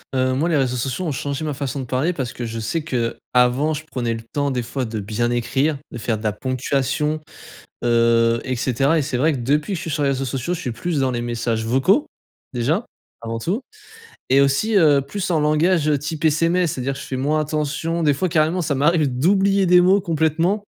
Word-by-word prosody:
Heu, 130 0 +2
moi 155 +6 +1
les 165 - +1
réseaux 130 -3 +1
sociaux 130 +8 -2
ont 155 - -1
changés 140 +2 -3
ma 150 -2 -2
façon 140 0 -4
de - - -5
parler 135 +9 0
parce 130 -6 -4
que 120 - -6
je 115 0 -5
sais 155 +9 -2
que, 125 -7 -2 0.2
avant 125 +5 +3
je 150 +1 -5
prenais 120 -6 -2
le 115 - -5
temps 145 -1 0
des 125 -2 -1
fois 130 +2 -3
de 110 -2 -4
bien 110 +4 -1
écrire, 135 +5 0
de 120 - -6
faire 110 0 -1
de 110 - -10
la 105 - +1
ponctuation, 135 +6 -1 0.6
heu 115 0 +3
et 130 - -2
cetera 135 +6 +1
et 150 - +1
c'est 130 -3 -2
vrai 155 +4 +2
que - - -3
depuis 150 - 0
que - - 0
je 165 - -5
suis 165 - -5
sur 145 - -1
les 140 - +2
réseaux 135 0 -1
sociaux 135 +7 -2
je - - -7
suis 125 - -3
plus 150 +6 -2
dans 130 -1 +1
les 120 -1 -2
messages 115 -1 -2
vocaux, 135 - +2 0.5
déjà 150 - 0 0.4
avant 115 0 -4
tout. 190 - -2 0.7
Et 135 +2 +5
aussi, 170 +11 +2
heu, 150 -6 +5
plus 185 +8 -4
en 160 -3 +2
langage 155 +1 +2
type 150 +2 -2
SMS. 165 +2 +2
C'est-à-dire 135 +1 -3
je - - -8
fais 135 - -5
moins 145 +4 +1
attention 155 +2 -2
des 150 -2 +3
fois 185 +7 -1
carrément 160 +2 +2
ça 150 -3 -1
m'arrive 150 +2 +3
d'oublier 195 +4 +3
des 180 0 +6
mots, 190 +3 +4
complètement, 165 +4 0
140 Hz, 225 wpm, -21 LUFS, 125-160 Hz, 0.7 s, des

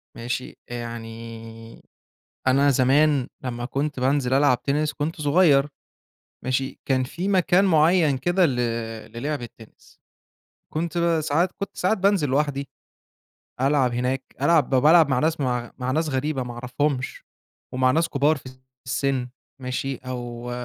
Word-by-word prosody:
ماشي، 120 +2 -5
يعني 115 -1 -8 0.6
أنا 140 +2 +4
زمان 140 +1 +3 0.2
لمّا 120 -1 -4
كنت 140 +2 -2
بانزل 130 0 +1
ألعب 135 -2 +3
تِنِس 150 +2 0
كنت 155 +2 -4
صغيّر 145 -2 +4 0.8
ماشي، 130 +1 -2
كان 130 -1 +1
في 170 +9 -4
مكان 185 -1 +3
معيّن 160 -4 +4
كده 175 +6 +2
ل 135 -5 -2 0.6
لِلِعب 140 +4 -3
التِنِس، 115 -2 -14 0.7
كنت 165 +1 -2 0.3
ساعات 165 +4 +1
كنت 200 - -7
ساعات 185 +5 +1
بانزل 190 -6 +2
لوحدي، 140 0 0 0.9
ألعب 135 -2 +2
هناك 125 +2 -1 0.2
ألعب 165 -3 +3
بالعب 150 +4 +5
مع 130 -2 +1
ناس 160 +2 0
م - - +1 0.3
مع 125 0 -2
ناس 160 +4 0
غريبة، 135 0 -1
ما 125 -1 -6
أعرفهُمش، 130 +2 -2 0.5
ومع 130 0 +3
ناس 165 +4 +2
كبار 145 +2 +2
في 130 -1 -10 0.4
السن، 130 0 -1 0.3
ماشي، 130 +1 -3
أو 120 -1 -6
135 Hz, 130 wpm, -24 LUFS, 125-155 Hz, 0.9 s, بالعب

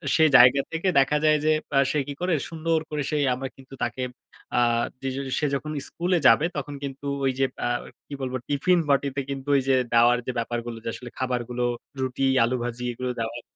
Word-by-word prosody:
সেই 160 -1 +5
জায়গা 125 +3 +7
থেকে 165 +3 -2
দেখা 140 +2 +3
যায় 155 0 +5
যে, - - +3 0.3
আ - - +7
সে 150 - +1
কি 145 - -4
করে? 180 -1 +1 0.2
সুন্দর 165 0 0
করে, 150 -1 -2
সে 150 - 0 0.2
আমরা 135 +1 -4
কিন্তু 135 0 -16
তাকে 120 +2 -3 0.6
আ - - +5 0.4
যে - - -2 0.3
সে 150 - 0
যখন 155 +2 -4 0.2
স্কুলে 180 +1 0
যাবে, 120 +8 +6
তখন 145 0 -4
কিন্তু 140 0 -6 0.2
ওই 135 - +3
যে 135 - +4 0.2
আ - - +1 0.4
কি - - -9
বলবো? 130 -1 -2
টিফিন 170 +6 +2
বাটিতে 140 0 +1
কিন্তু 135 0 -5
ওই 135 - +4
যে, 135 - +4 0.2
দাওয়ার 120 +1 +5
যে - - 0
ব্যাপারগুলো, 120 0 -4
যে - - -1
আসলে 125 - -8
খাবারগুলো, 125 -1 -2 0.4
রুটি, 130 +1 -1 0.2
আলু 120 +2 +1
ভাজি, 120 0 -4
এগুলো 125 +1 -4
দেওয়ার 115 +1 -4
135 Hz, 200 wpm, -25 LUFS, 125-150 Hz, 0.6 s, জায়গা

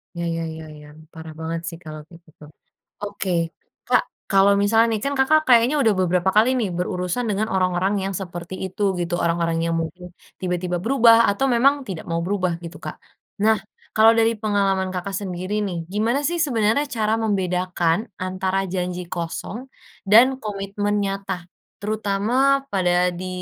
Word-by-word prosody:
Iya 170 - -4
iya 165 0 -3
iya 160 - -8
iya. 150 0 -13 0.3
Parah 160 -1 -9
banget 165 +1 -3
sih 165 - -9
kalo 155 -2 -8
kayak 170 0 -16
gitu. 155 - -18 0.6
Oke. 200 -2 -4 0.6
Kak, - - +4 0.3
kalo 195 0 +5
misalnya 225 +3 +4
nih - - -5
kan 280 - 0
Kakak 310 +4 +4
kayaknya 245 +4 +5
udah 220 -4 +4
beberapa 180 +1 +2
kali 220 +3 +6
nih, 210 - 0
berurusan 180 +6 -2
dengan 210 +2 0
orang-orang 185 +1 +1
yang 195 0 -3
seperti 175 -1 -7
itu, 190 +2 -5 0.2
gitu, 175 0 -2
orang-orang 170 -1 0
yang 165 0 0
mungkin 180 +2 -6 0.3
tiba-tiba 180 -1 -2
berubah 230 -2 +6
atau 200 +6 -1
memang 270 +4 +5
tidak 180 -4 -5
mau 165 0 0
berubah, 185 -3 -1
gitu, 170 +1 -8
Kak. - - -6 0.5
Nah, 220 0 +4 0.4
kalau 220 +1 +7
dari 225 0 +3
pengalaman 195 -3 +1
Kakak 185 +2 -4
sendiri 185 +2 -3
nih, 190 -4 -2
gimana 235 +7 0
sih 340 +3 0
sebenarnya 245 -1 +2
cara 220 -4 0
membedakan 180 -5 0 0.2
antara 185 +1 -1
janji 180 -1 -3
kosong 175 +8 -5 0.4
dan 255 +6 +6
komitmen 205 0 -2
nyata, 195 -2 -4 0.3
terutama 220 +7 +1
pada 180 -1 +2
di 180 +1 -6
195 Hz, 160 wpm, -22 LUFS, 180-220 Hz, 0.6 s, kalau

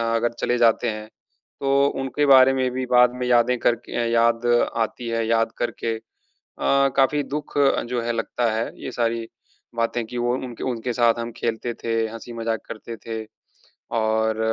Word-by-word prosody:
अगर 120 +1 0
चले 120 - +1
जाते 120 0 +3
हैं 110 0 -6 0.5
तो 140 0 +3
उनके 135 +2 0
बारे 135 -1 +7
में 130 -1 +1
भी 130 +1 -3
बाद 125 0 +5
में 125 0 -3
यादें 125 0 +3
करके 120 0 0
याद 115 0 +2 0.3
आती 115 +1 -2
है, 115 0 0
याद 115 0 +2
करके 115 -1 -2
अ, - - -15 1.0
काफ़ी 140 +2 +3
दुःख 145 +1 -5 0.3
जो 125 0 -1
है 120 0 -1
लगता 115 +1 -1
है 110 +1 -1
ये - - -4
सारी 115 -1 -1 0.5
बातें 115 0 -1
की 120 +2 -6
वो 120 0 +1
उनके 125 -2 -5
उनके 125 -1 -2
साथ 120 -1 +3
हम 115 0 -4
खेलते 115 +1 -2
थे, 115 0 -3
हँसी 115 +2 -9
मजाक 115 -1 -2
करते 115 +1 -7
थे 110 0 -6 0.7
और 110 0 +1
120 Hz, 170 wpm, -23 LUFS, 115-125 Hz, 1.0 s, बारे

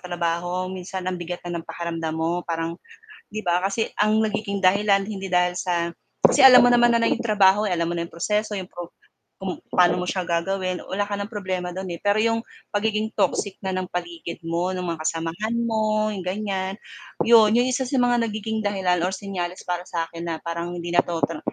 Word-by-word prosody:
trabaho 175 +1 -2
minsan 185 0 -6
ang 185 - 0
bigat 175 +1 -4
na 175 -1 -3
ng - - -12
pakiramdam 165 -2 -3
mo 165 +2 0
parang, 165 0 -2 0.5
'di 215 - -5
ba 175 0 +2
kasi 200 +4 -1
ang 215 +1 +3
nagiging 205 -2 -2
dahilan 200 +1 +4
hindi 195 -2 -5
dahil 180 -1 +2
sa 170 -2 0 0.3
kasi - - +5
alam 255 -1 +10
mo 245 - +6
naman 240 -1 +5
na 230 - +1
'yong - - 0
trabaho 210 -2 +4
eh, 185 - +1
alam 170 0 -1
mo - - -1
na 170 - -2
'yong - - -18
proseso, 210 +5 -1
'yong 190 -2 -5
pro 175 -1 -7 0.5
kung 190 -2 -3 0.2
pano 180 0 +3
mo 180 - -3
siya 185 -1 -2
gagawin 185 +2 -1
wala 205 +2 -2
ka 205 - -3
ng 200 +1 -4
problema 185 -4 -3
do'n 190 0 -5
eh, 170 - -9
pero 205 +1 +2
'yong 225 0 +2 0.3
pagiging 215 +1 0
toxic 200 -2 0
na 190 - -2
ng 185 0 -2
paligid 170 -1 -5
mo, 170 +2 0
ng 180 - -3
mga 165 -1 -3
kasamahan 165 +8 -2
mo 215 -2 +1
'yong 195 -4 -5
ganyan, 190 -1 -2 0.5
'yon 225 -2 +7
'yong 245 +2 +3
isa 260 +1 0
sa 265 +1 0
mga 245 -1 +3
nagiging 220 0 -3
dahilan 190 -3 +1
or 185 - -2
senyales 185 -2 -4
para 175 0 -2
sa 165 -1 -3
akin 170 0 -7
na 165 - -1
parang 170 +1 -4
hindi 175 0 -5
na 175 - +4
'to 170 -1 -2
ta 165 -2 -6
185 Hz, 210 wpm, -24 LUFS, 175-210 Hz, 0.5 s, alam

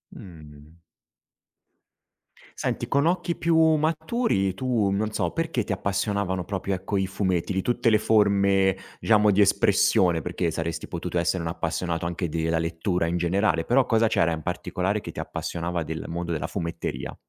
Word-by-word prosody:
Mh-mh. 80 -2 -13 1.8
Senti, - - -2
con 140 +2 +2
occhi 175 0 0
più 165 -1 +1 0.2
maturi, 155 - 0
tu 115 -1 0
non 105 +2 -1
so, 90 -5 -1
perché 165 -8 -1
ti - - -5
appassionavano 100 -1 -1
proprio, 100 +1 -3
ecco, 95 +2 -2
i 95 -1 0
fumetti 95 -2 -1
di 95 - 0
tutte 120 +2 +1
le 110 - +5
forme, 100 -3 +3 0.2
diciamo, 105 -2 +4
di 100 - +3
espressione? 90 -3 +3
Perché 85 +3 -2
saresti 80 +1 -4
potuto 90 0 -4
essere 85 +1 0
un 80 - -2
appassionato 85 0 -2
anche 85 0 -3
della 80 +1 0
lettura 85 +2 -1
in 85 +1 -1
generale, 85 -1 +1
però 130 +2 +3
cosa 115 -2 +3
c'era 85 -6 +2
in 80 - -3
particolare 90 +4 -2
che - - -7
ti - - -8
appassionava 85 0 -3
del 80 0 -5
mondo 85 +1 -4
della 80 - -2
fumetteria? 85 -3 -4
95 Hz, 160 wpm, -25 LUFS, 85-105 Hz, 1.8 s, le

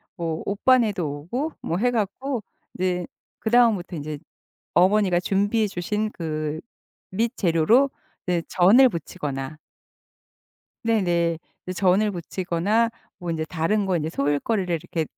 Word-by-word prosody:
뭐 165 -3 -3
오빠네도 205 - +2 0.2
오고 290 +6 -1
뭐 170 - -2
해 245 +6 +2
갖고 235 +3 -2 0.3
이제 180 -1 -1 0.3
그 220 - -2
다음부터 220 -7 +3
이제 150 -1 -5 0.6
어머니가 185 -1 +4
준비해 205 +4 +1
주신 210 +3 -2
그 155 -2 -3 0.5
밑 225 +3 0
재료로 195 - +3 0.4
이제 175 -2 +1
전을 210 +9 +6
부치거나 150 - -5 1.2
네네. 175 -8 +1 0.3
이제 185 - -3
전을 195 +3 +3
부치거나 185 +5 0 0.3
뭐 175 -2 -4
인제 160 -1 -1
다른 180 +6 0
거 185 -2 +1
인제 155 -1 -1
소일거리를 170 +6 0
이렇게 165 0 -2
185 Hz, 270 characters per minute, -24 LUFS, 165-215 Hz, 1.2 s, 전을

